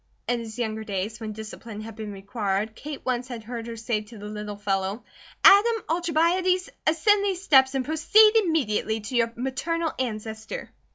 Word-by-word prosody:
In 245 -1 +1
his 225 -1 -8
younger 220 -2 -2
days, 210 +1 -3
when 220 -2 -5
discipline 215 0 -8
had 220 0 -8
been 215 -1 -6
required, 200 +1 -2
Kate 295 +4 -8
once 250 -1 -1
had 240 -3 -7
heard 230 0 -6
her 230 -1 -6
say 225 -1 -1
to 215 +2 -13
the 205 - -9
little 210 0 -6
fellow: 200 +1 -2 0.4
"Adam 450 +3 +7
Alcibiades 345 +3 +1 0.2
ascend 400 +6 +4
these 385 -2 -1
steps 265 -5 +5
and 260 -1 0
proceed 420 +8 +5
immediately 265 - +1
to 235 +5 -6
your 230 -1 +2
maternal 320 +6 -2
ancestor." 220 -2 -5
235 Hz, 170 wpm, -25 LUFS, 215-320 Hz, 0.4 s, Adam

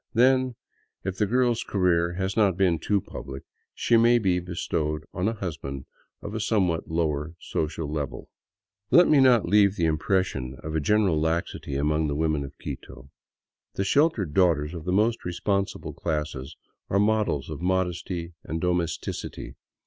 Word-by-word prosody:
Then, 130 +1 +4 0.5
if 95 0 -3
the 105 - +2
girl's 120 +1 +2
career 85 -3 +1
has 95 +1 -2
not 100 -5 +3
been 90 -4 +2
too 100 +4 +1
public, 70 -4 -8 0.3
she 120 - +3
may 120 +1 +5
be 95 -5 +1
bestowed 80 -3 -2
on 95 +2 -1
a 115 - +1
husband 70 -9 -5 0.4
of 100 - -6
a 110 - -2
somewhat 95 -7 0
lower 80 -1 -1
social 80 0 -3
level. 75 -3 -4 0.6
Let 175 - +7
me 150 - +5
not 125 -4 +5
leave 100 +1 +4
the 85 - +1
impression 80 -5 0
of 80 - -5
a 80 - +1
general 95 0 +2
laxity 80 -3 -2
among 75 +2 +1
the 70 - -2
women 80 -1 0
of 70 - -10
Quito. 70 +2 -9 0.6
The 95 - 0
sheltered 105 - +2
daughters 80 -4 +2
of 80 -3 -7
the 90 - -1
most 110 +5 +2
responsible 100 +2 -2
classes 75 -3 -4 0.3
are 100 - +1
models 105 -9 +1
of 75 - -6
modesty 90 -1 -1
and 80 - -4
domesticity. 90 -2 -3
90 Hz, 155 wpm, -26 LUFS, 75-105 Hz, 0.6 s, Let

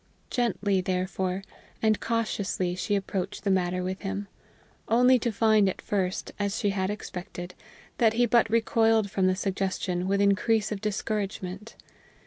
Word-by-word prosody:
Gently, 205 -5 +1
therefore, 185 +1 -2 0.4
and 220 -1 +2
cautiously 205 -5 -1
she 195 +3 -1
approached 195 0 -3
the 200 - +1
matter 180 -1 +1
with 185 +1 -4
him, 200 0 -4 0.6
only 250 +2 +5
to 235 0 -1
find 215 -2 +4
at - - -5
first, 190 -2 -2
as 200 +1 -1
she 205 -3 +1
had 190 -1 -1
expected, 180 -3 -6 0.5
that 225 -2 +4
he 240 +2 +3
but 235 -1 +3
recoiled 225 -2 +3
from 190 -1 +2
the 185 - +2
suggestion 190 -2 -2
with 200 +1 +1
increase 205 +2 +2
of 205 -2 -3
discouragement. 210 -1 -3
200 Hz, 145 wpm, -27 LUFS, 185-220 Hz, 0.6 s, only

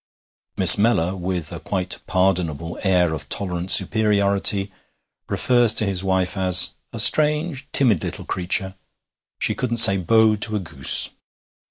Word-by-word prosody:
Miss 95 +1 +7
Mellor, 95 -5 -1
with 90 -3 -6
a - - -9
quite 95 -2 -4
pardonable 85 -4 -3
air 90 -4 -1
of 75 -2 -9
tolerant 90 -2 -5
superiority, 100 -2 0 0.6
refers 120 -3 +1
to 110 - 0
his 95 -2 -3
wife 95 -1 -3
as 90 -2 +3 0.2
'a - - -9
strange, 150 -2 +2
timid 115 - 0
little - - -8
creature 95 +1 -3 0.6
she - - -3
couldn't 120 -2 -5
say 110 -4 +8
Bo 110 +4 +1
to 110 +1 -4
a - - -3
goose.' 70 -8 +1
95 Hz, 140 wpm, -19 LUFS, 90-110 Hz, 0.6 s, say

